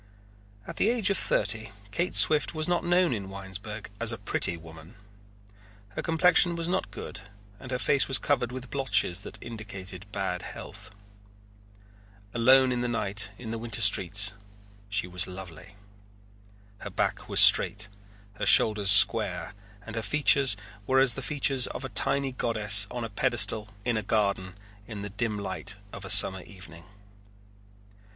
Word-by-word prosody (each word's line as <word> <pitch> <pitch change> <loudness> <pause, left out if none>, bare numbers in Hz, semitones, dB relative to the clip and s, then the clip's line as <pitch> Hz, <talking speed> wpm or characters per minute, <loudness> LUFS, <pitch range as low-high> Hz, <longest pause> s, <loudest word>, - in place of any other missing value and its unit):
At - - -10
the 215 - +1
age 230 -4 0
of 195 - 0
thirty 110 +1 0 0.2
Kate 175 - -3
Swift 155 +1 +4
was 155 0 -3
not 175 -1 -1
known 175 -3 +1
in 100 -4 -6
Winesburg 100 +2 -9
as - - +1
a - - -6
pretty 85 - -1
woman. 80 +4 -15 0.9
Her 100 - -7
complexion 175 +1 +3
was 170 0 -4
not 185 +2 -3
good - - -9 0.4
and 130 - -12
her 125 - -3
face 140 +2 +1
was 135 - +3
covered 130 -5 -2
with 130 0 -9
blotches 105 -9 0
that - - -10
indicated 100 -5 -9
ill 95 -3 -4
health. 100 +3 -9 1.4
Alone 130 +2 +3
in 125 -1 -2
the 125 - -2
night 105 -3 -1
in 110 -1 -9
the 115 - -5
winter 115 -2 0
streets 100 0 +2 0.6
she 100 -3 -2
was 90 0 0
lovely. 90 0 -12 1.0
Her - - -8
back - - -4
was - - +2
straight, 105 0 +5 0.5
her - - -2
shoulders 105 -3 +5
square, 100 -4 +5 0.3
and 115 - -9
her 115 - -3
features 135 -1 +3 0.3
were 130 0 +2
as 135 -3 +4
the 135 - -7
features 135 -2 +2
of 135 - -8
a - - -7
tiny 135 +5 +2
goddess 105 -4 +3
on 120 -1 -6
a 115 - -6
pedestal 105 +2 0 0.2
in 120 -2 -1
a - - -2
garden 100 -3 -2 0.3
in 105 -3 -8
the 100 - -8
dim 110 0 -4
light 95 -1 -5 0.2
of - - -9
a - - -8
summer 95 -2 +6
evening. 90 -4 -14
110 Hz, 160 wpm, -26 LUFS, 100-130 Hz, 1.4 s, summer